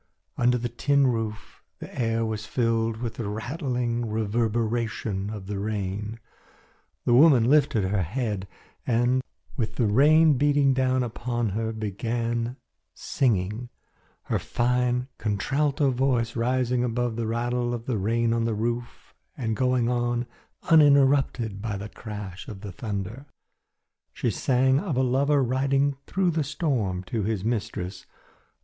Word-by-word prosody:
Under 125 +1 +3
the 120 0 -2
tin 140 +4 +2
roof, 110 -4 -3 0.2
the - - -10
air 115 -1 0
was 110 -1 -4
filled 115 -2 0
with 115 -1 -4
the 110 -4 -3
rattling 120 - -2
reverberation 110 -2 -1
of 105 -3 -6
the 100 0 -4
rain. 105 +1 -3 0.9
The 120 - +3
woman 135 -2 +7
lifted 130 -5 +3
her 95 +1 0
head 105 - -2 0.4
and, 120 +2 +2 0.4
with 110 -2 -2
the 120 - +1
rain 145 +6 +5
beating 145 -1 +3
down 130 -1 +1
upon 120 -1 -2
her, 110 +3 -2
began 115 +3 -2 0.4
singing, 115 -2 -1 0.5
her - - -1
fine 125 +1 0
contralto 135 +7 +1
voice 125 -3 0
rising 125 +1 +1
above 120 -1 -1
the 115 -1 -2
rattle 120 +1 -1
of 120 -1 -4
the 120 -6 -1
rain 115 +3 +1
on 115 0 0
the 115 -2 0
roof 120 +2 -4 0.2
and 110 -3 -1
going 125 0 +1
on 120 0 0 0.5
uninterrupted 135 -8 +4
by 105 -2 -3
the 105 +2 -7
crash 105 -5 -8
of 100 -3 -8
the 105 -2 -6
thunder. 105 +7 -5 0.9
She - - -1
sang 130 +1 +2
of 165 -8 -3
a 130 - +3
lover 140 +3 +2
riding 135 +3 +1
through 185 -2 +1
the 160 -1 0
storm 125 - -1
to 110 +4 -3
his 105 -1 -1
mistress. 110 -5 -3
120 Hz, 140 wpm, -26 LUFS, 110-130 Hz, 0.9 s, woman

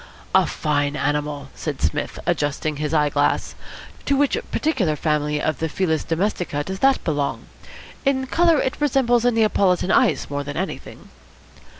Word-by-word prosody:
"A - - +5
fine 145 -1 -1
animal," 145 -1 -2
said 150 -4 -5
Psmith, 80 - -2
adjusting 145 +1 -1
his 150 0 -2
eyeglass. 145 -2 +1 0.5
"To 280 - +2
which 285 0 +2 0.2
particular 225 - 0
family 150 -1 0
of 155 -1 -1
the 160 - -1
Felis 160 -2 0
Domestica 170 -4 -1
does 190 +4 -5
that 270 +3 +3
belong? 145 -3 -2 0.6
In 270 -2 +1
colour 330 +2 +3
it 260 - -2
resembles 245 -4 +2
a 245 - +5
Neapolitan 200 -5 +2
ice 215 - +3
more 145 0 -3
than 145 0 -6
anything." 190 +3 -6
160 Hz, 145 wpm, -22 LUFS, 145-240 Hz, 0.6 s, A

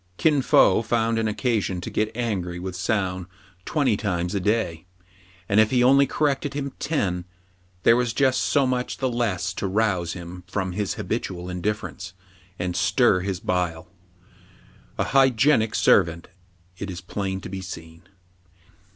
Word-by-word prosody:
Kin 150 -4 +3
Fo 105 -5 +5
found 115 0 0
an 110 - 0
occasion 105 -4 -1
to - - -6
get 110 0 0
angry 95 -8 -2
with 90 0 -5
Soun 95 -2 -1 0.4
twenty 140 -8 +1
times 90 -3 -2
a 100 - 0
day; 90 -5 -1 0.6
and, 100 - +3
if 110 0 +5
he 125 0 +3
only 140 +2 +5
corrected 145 0 0
4iim 140 -1 -3
ten, 95 - -1 0.6
there 115 - +6
was 125 -1 +1
just 130 -1 +2
so 140 -2 +2
much 125 -1 -1
the 130 -2 -1
less 100 -6 -1
to 100 - -3
rouse 95 -5 0
him 90 0 -9
from 95 0 -2
his 100 +2 -2
habitual 90 0 -4
indifference, 95 -1 -4 0.4
and 90 0 -3
stir 100 +1 +3
his 95 0 -3
bile. 90 -4 -2 1.1
A - - +1
hygienic 130 -3 +3
servant, 85 -3 +3 0.5
it 100 - -4
is 90 -1 -5
plain 95 0 -4
to - - -8
be 95 0 -5
seen. 80 -2 -9
100 Hz, 150 wpm, -24 LUFS, 90-120 Hz, 1.1 s, there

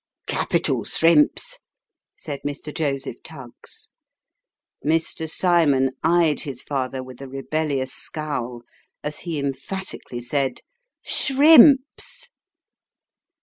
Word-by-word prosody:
" - - -67
Capital - - 0
srimps! 165 -3 +2 0.3
" - - -66
said 145 -2 -5
Mr. 145 +1 -5
Joseph 135 -5 -2
Tuggs. 135 -7 -9 0.9
Mr. 160 0 0
Cymon 155 -7 +3
eyed 165 -2 +3
his 130 -3 -5
father 130 -2 -3
with 130 0 -12
a 135 - -7
rebellious 135 -1 -2
scowl, 125 -6 -3 0.4
as 150 0 -4
he 165 -4 -4
emphati 140 +8 -4
cally 120 - -5
said 130 +1 -2 0.2
" - - -62
Shrimps." 295 - +4
145 Hz, 105 wpm, -23 LUFS, 135-165 Hz, 0.9 s, Shrimps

